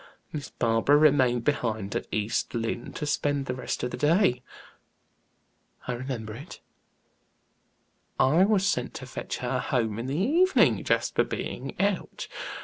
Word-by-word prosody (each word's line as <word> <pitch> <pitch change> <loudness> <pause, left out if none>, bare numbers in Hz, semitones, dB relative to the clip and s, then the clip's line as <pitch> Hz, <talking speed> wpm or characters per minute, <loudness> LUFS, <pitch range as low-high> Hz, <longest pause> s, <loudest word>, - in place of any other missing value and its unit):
Miss 150 -3 -5
Barbara 115 +5 +3
remained 130 -6 +4
behind 110 -8 -1
at - - -2
East 110 +3 -1
Lynne 115 +1 -3
to 150 - -4
spend 145 -1 0
the 125 - -2
rest 125 -1 -4
of 125 - -2
the - - -5
day." 150 -3 +3 1.5
"I 125 - -1
remember 120 -3 -5
it." 145 +10 -10 1.6
"I 155 +8 +5
was 200 -2 +2
sent 125 -12 -1
to 130 - -6
fetch 125 - -5
her 125 +1 0
home 115 -4 -1
in 120 - -4
the 140 +3 -2
evening, 330 - +3
Jasper - - +1
being - - -5
out. - - -1
130 Hz, 140 wpm, -27 LUFS, 120-150 Hz, 1.6 s, I